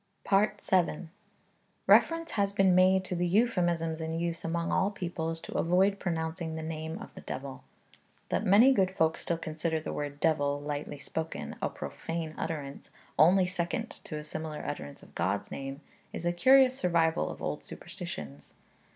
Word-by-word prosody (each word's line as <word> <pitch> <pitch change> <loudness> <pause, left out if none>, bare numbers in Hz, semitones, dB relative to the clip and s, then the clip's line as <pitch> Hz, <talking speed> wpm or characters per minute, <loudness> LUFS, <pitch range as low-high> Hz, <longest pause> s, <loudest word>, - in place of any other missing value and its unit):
VII. 195 -4 +2 0.8
Reference 330 0 +4
has 200 -2 +1
been 195 -2 +4
made 185 +1 +5
to 180 - -3
the 175 0 0
euphemisms 175 -6 +1
in 160 0 -3
use 170 -1 -2
among 170 0 -1
all 190 +2 +2
peoples 170 -4 -4
to - - -9
avoid 190 +4 +3
pronouncing 160 -1 -3
the 160 - -4
name 160 0 -4
of - - -10
the - - -10
devil. 135 0 -6 0.7
That - - 0
many 220 +7 +6
good 190 -7 +3
folk 160 -4 +1
still 170 - -2
consider 160 0 -2
the 155 - -5
word 145 -1 -4
devil, 145 -3 +1
lightly 145 0 -4
spoken, 160 +3 -5
a - - 0
profane 165 -1 -5
utterance 145 -4 -5 0.3
only 180 +4 +6
second 180 +5 -2
to 155 - -7
a 150 - -6
similar 155 0 -5
utterance 70 -1 -6
of - - -17
God's 95 +4 -1
name, 135 +1 -6 0.3
is 170 - -4
a 175 - +2
curious 260 +6 +6
survival 170 -6 +1
of - - -7
old 150 - -3
superstitions. 125 - -8
165 Hz, 160 wpm, -30 LUFS, 155-185 Hz, 0.8 s, many